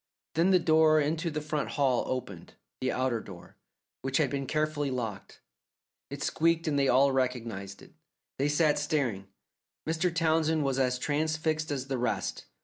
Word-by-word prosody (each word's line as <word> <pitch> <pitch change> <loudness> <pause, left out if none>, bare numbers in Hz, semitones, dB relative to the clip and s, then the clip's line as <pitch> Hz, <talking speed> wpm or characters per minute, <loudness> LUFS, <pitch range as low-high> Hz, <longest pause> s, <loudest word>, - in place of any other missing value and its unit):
Then 170 +4 +3
the 190 - +6
door 160 -2 +4
into 160 +3 0
the 155 -1 -3
front 150 -1 -2
hall 130 -4 +2
opened 120 -9 -5 0.2
the 130 - 0
outer 130 -2 0
door, 95 -5 -12 0.4
which 135 0 0
had 145 -5 +1
been 140 -1 -3
carefully 155 -1 0
locked. 115 -6 -5 0.7
It 140 0 -5
squeaked 165 0 +1
and 145 -2 +1
they 135 - +3
all 135 +2 +4
recognized 115 -7 -3
it. - - -17 0.5
They 140 +2 +2
sat 150 0 +3
staring. 140 - -1 0.6
Mr. 165 +3 +1
Townsend 160 -1 +1
was 135 -1 0
as 125 -1 +1
transfixed 155 +2 -1
as 135 -3 -2
the 135 -2 -3
rest. 125 - -2
145 Hz, 160 wpm, -29 LUFS, 130-155 Hz, 0.7 s, the